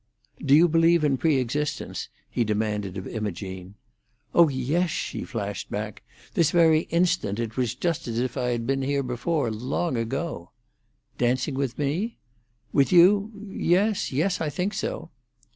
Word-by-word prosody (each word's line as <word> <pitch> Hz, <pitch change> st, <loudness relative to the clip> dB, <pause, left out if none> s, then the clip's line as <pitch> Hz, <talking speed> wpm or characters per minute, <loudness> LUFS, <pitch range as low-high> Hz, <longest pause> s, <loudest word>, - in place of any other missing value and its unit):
"Do 140 Hz, -, +5 dB
you 165 Hz, +3 st, +7 dB
believe 165 Hz, 0 st, +4 dB
in 140 Hz, -3 st, +2 dB
pre 160 Hz, -3 st, +3 dB
existence?" 145 Hz, +4 st, -2 dB, 0.2 s
he 120 Hz, -, 0 dB
demanded 105 Hz, -3 st, -2 dB
of 95 Hz, -, -5 dB
Imogene. 95 Hz, -3 st, -5 dB, 0.6 s
"Oh 170 Hz, -2 st, +6 dB
yes!" 145 Hz, +7 st, 0 dB
she -, -, -3 dB
flashed 105 Hz, -5 st, -5 dB
back. 105 Hz, 0 st, -5 dB, 0.3 s
"This 165 Hz, -3 st, +3 dB
very 160 Hz, -1 st, +4 dB
instant 170 Hz, -, +1 dB
it 115 Hz, -2 st, -3 dB
was 125 Hz, -2 st, -1 dB
just 165 Hz, +1 st, -2 dB
as 115 Hz, -1 st, -3 dB
if 125 Hz, 0 st, -1 dB
I 125 Hz, -2 st, -1 dB
had 120 Hz, -1 st, -1 dB
been 135 Hz, +1 st, 0 dB
here 140 Hz, +1 st, 0 dB
before, 130 Hz, +1 st, -1 dB
long 130 Hz, +6 st, -2 dB
ago." 115 Hz, -, -3 dB, 0.7 s
"Dancing 125 Hz, +4 st, +1 dB
with 135 Hz, -2 st, -2 dB
me?" 165 Hz, +11 st, -1 dB, 0.6 s
"With 140 Hz, -1 st, +3 dB
you? 195 Hz, +4 st, +6 dB, 0.2 s
Yes—yes—I 185 Hz, -4 st, +1 dB
think 185 Hz, +7 st, -2 dB
so." -, -, -4 dB
135 Hz, 145 wpm, -25 LUFS, 115-170 Hz, 0.7 s, you